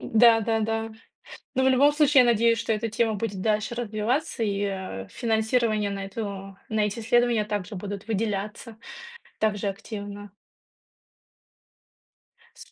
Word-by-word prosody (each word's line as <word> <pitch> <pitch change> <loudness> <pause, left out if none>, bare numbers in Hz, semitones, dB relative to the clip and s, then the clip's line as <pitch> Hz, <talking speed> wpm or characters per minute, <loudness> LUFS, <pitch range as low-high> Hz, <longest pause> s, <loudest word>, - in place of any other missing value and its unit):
Да-да-да. 225 -1 +3 0.6
Но 260 - +2
в 265 - +4
любом 270 +3 +5
случае, 295 -2 +5
я 240 - +4
надеюсь, 230 0 +3
что 225 - -1
эта 220 +1 -1
тема 220 +1 0
будет 205 -2 -3
дальше 215 +3 0
развиваться, 240 +5 -1
и, 205 -2 0
э, 190 - -4
финансирование 220 -2 0
на 195 0 -4
эту 195 -1 -6
на 220 -1 0
эти 210 +2 -3
исследования 235 -1 +2
также 205 -1 -4
будут 200 +2 -6
выделяться, 215 +1 -3 0.6
также 210 -2 0
активно. 205 0 -7 2.3
С - - -14
220 Hz, 125 wpm, -26 LUFS, 205-230 Hz, 2.3 s, любом